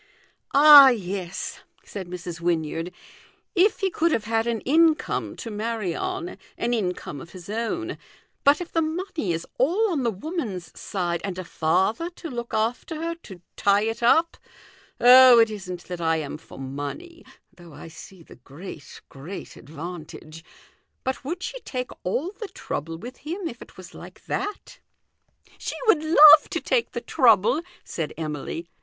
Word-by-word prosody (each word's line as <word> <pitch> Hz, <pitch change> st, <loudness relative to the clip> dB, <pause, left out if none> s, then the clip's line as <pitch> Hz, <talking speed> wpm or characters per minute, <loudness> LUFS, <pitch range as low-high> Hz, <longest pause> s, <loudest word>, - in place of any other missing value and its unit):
" -, -, -47 dB
Ah, 285 Hz, -1 st, +10 dB
yes," 190 Hz, -6 st, -4 dB, 0.3 s
said 195 Hz, -3 st, -7 dB
Mrs. 175 Hz, -1 st, -7 dB
Wynyard, 165 Hz, 0 st, -1 dB, 0.4 s
" -, -, -37 dB
if 435 Hz, +2 st, -1 dB
he 385 Hz, -1 st, +1 dB
could 335 Hz, 0 st, +1 dB
have 225 Hz, -, 0 dB
had 225 Hz, +1 st, 0 dB
an 230 Hz, -2 st, -1 dB
income 320 Hz, +2 st, +2 dB
to 230 Hz, -, -7 dB
rnarry 215 Hz, -3 st, -3 dB
on 370 Hz, -1 st, -4 dB, 0.2 s
an 240 Hz, +1 st, -1 dB
income 180 Hz, -, -3 dB
of 170 Hz, -, -13 dB
his 185 Hz, +1 st, -9 dB
own; 235 Hz, +11 st, -3 dB, 0.4 s
but 285 Hz, +1 st, +5 dB
if 350 Hz, -1 st, -7 dB
the 330 Hz, -, +1 dB
money 315 Hz, -, -3 dB
is 165 Hz, 0 st, -3 dB
all 370 Hz, -, +2 dB
on 305 Hz, -5 st, -1 dB
the 240 Hz, -, +1 dB
woman's 205 Hz, -, -5 dB
side, 175 Hz, -3 st, -2 dB
and 190 Hz, -2 st, -4 dB
a 185 Hz, -, -4 dB
father 190 Hz, -, 0 dB
to 330 Hz, -, -8 dB
look 235 Hz, -1 st, -5 dB
after 230 Hz, +8 st, -2 dB
her, 330 Hz, +2 st, -3 dB
to 190 Hz, -, -13 dB
tie 200 Hz, +1 st, +3 dB
it 225 Hz, +1 st, -3 dB
up. 320 Hz, +8 st, +3 dB, 0.6 s
Oh, 250 Hz, 0 st, +9 dB
it 225 Hz, -1 st, +5 dB
isn't 180 Hz, -4 st, -7 dB
that 180 Hz, -1 st, -7 dB
I 165 Hz, 0 st, +2 dB
am 150 Hz, -1 st, -5 dB
for -, -, -14 dB
money, 145 Hz, -, -7 dB, 0.3 s
though 170 Hz, -3 st, -15 dB
I -, -, -10 dB
see 170 Hz, +2 st, -13 dB
the -, -, -16 dB
great, 145 Hz, +3 st, -11 dB
great 150 Hz, +8 st, -9 dB
advantage. 160 Hz, +1 st, -9 dB, 0.6 s
But 260 Hz, 0 st, -3 dB
would 345 Hz, +7 st, -5 dB
she -, -, -5 dB
take 255 Hz, -, -5 dB
all 280 Hz, -, -2 dB
the 430 Hz, 0 st, -8 dB
trouble 165 Hz, -, -6 dB
with 245 Hz, +7 st, -9 dB
him 340 Hz, +5 st, -5 dB
if 240 Hz, -5 st, -9 dB
it -, -, -14 dB
was 185 Hz, -2 st, -12 dB
like -, -, -13 dB
that?" 415 Hz, +5 st, -5 dB, 0.4 s
" -, -, -37 dB
She -, -, -4 dB
would 390 Hz, -9 st, +4 dB
love 310 Hz, -1 st, +8 dB
to -, -, -2 dB
take 470 Hz, -, 0 dB
the -, -, -4 dB
trouble," 470 Hz, -9 st, +3 dB, 0.2 s
said 160 Hz, -3 st, -5 dB
Emily. 155 Hz, +1 st, -5 dB
225 Hz, 170 wpm, -24 LUFS, -, 0.6 s, Ah